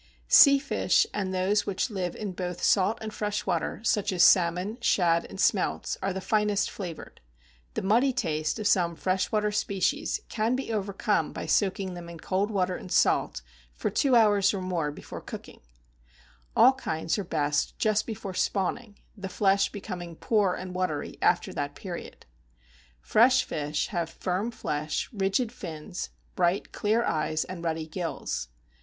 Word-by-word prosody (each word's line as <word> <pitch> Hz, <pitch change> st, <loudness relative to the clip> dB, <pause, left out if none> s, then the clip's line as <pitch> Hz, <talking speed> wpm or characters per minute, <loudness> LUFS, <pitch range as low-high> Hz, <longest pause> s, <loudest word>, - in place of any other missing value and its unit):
Sea 280 Hz, -1 st, +8 dB
fish, 275 Hz, -, +2 dB
and 190 Hz, -2 st, -2 dB
those 190 Hz, +3 st, +1 dB
which 200 Hz, +4 st, -1 dB
live 185 Hz, -4 st, -3 dB
in 210 Hz, -3 st, -4 dB
both 180 Hz, -1 st, -5 dB
salt 205 Hz, +3 st, +3 dB
and 215 Hz, -1 st, -5 dB
fresh 210 Hz, 0 st, -2 dB
water, 175 Hz, +2 st, -1 dB
such 210 Hz, -2 st, +1 dB
as 180 Hz, -2 st, +3 dB
salmon, 185 Hz, +5 st, +4 dB
shad, 170 Hz, -6 st, +2 dB
and -, -, -10 dB
smelts, 195 Hz, -1 st, +1 dB
are 195 Hz, -, 0 dB
the 190 Hz, -, -3 dB
finest 210 Hz, 0 st, +1 dB
flavored; 175 Hz, -5 st, -8 dB, 0.5 s
the -, -, -2 dB
muddy 235 Hz, +8 st, +3 dB
taste 155 Hz, -10 st, -1 dB
of 215 Hz, -, -5 dB
some 175 Hz, -4 st, +2 dB
fresh 185 Hz, +2 st, -1 dB
water 210 Hz, -1 st, +1 dB
species 210 Hz, -, 0 dB
can 225 Hz, +2 st, 0 dB
be 260 Hz, -3 st, -3 dB
overcome 205 Hz, +1 st, 0 dB
by -, -, -6 dB
soaking 190 Hz, -2 st, 0 dB
them 175 Hz, -1 st, -8 dB
in 170 Hz, -1 st, -9 dB
cold 195 Hz, +5 st, -1 dB
water 185 Hz, -3 st, 0 dB
and 185 Hz, -, -9 dB
salt -, -, +2 dB, 0.3 s
for -, -, -2 dB
two 270 Hz, -3 st, +3 dB
hours 205 Hz, -3 st, +4 dB
or -, -, -2 dB
more 175 Hz, -5 st, -2 dB
before 145 Hz, -, -9 dB
cooking; -, -, -10 dB, 0.9 s
all 260 Hz, +2 st, +7 dB
kinds 165 Hz, -8 st, -2 dB
are -, -, -2 dB
best 150 Hz, -4 st, -1 dB
just 215 Hz, -1 st, +1 dB
before 200 Hz, -4 st, -5 dB
spawning, 205 Hz, +3 st, -1 dB, 0.2 s
the 195 Hz, -2 st, -6 dB
flesh 195 Hz, +1 st, +2 dB
becoming 180 Hz, -5 st, -7 dB
poor 200 Hz, -1 st, +1 dB
and 185 Hz, 0 st, -7 dB
watery 180 Hz, -6 st, -3 dB
after -, -, +2 dB
that 145 Hz, 0 st, -3 dB
period. 180 Hz, -3 st, -8 dB, 0.8 s
Fresh 255 Hz, -, +4 dB
fish 150 Hz, -1 st, -2 dB
have 170 Hz, -4 st, -2 dB
firm 185 Hz, +6 st, -2 dB
flesh, 155 Hz, -9 st, -3 dB
rigid 200 Hz, +4 st, 0 dB
fins, 170 Hz, +1 st, -6 dB, 0.3 s
bright, 180 Hz, +2 st, +1 dB
clear 220 Hz, +3 st, +1 dB
eyes, 155 Hz, -3 st, 0 dB
and 180 Hz, -2 st, -7 dB
ruddy 160 Hz, -1 st, -2 dB
gills. 165 Hz, -, -4 dB
190 Hz, 160 wpm, -27 LUFS, 175-210 Hz, 0.9 s, Sea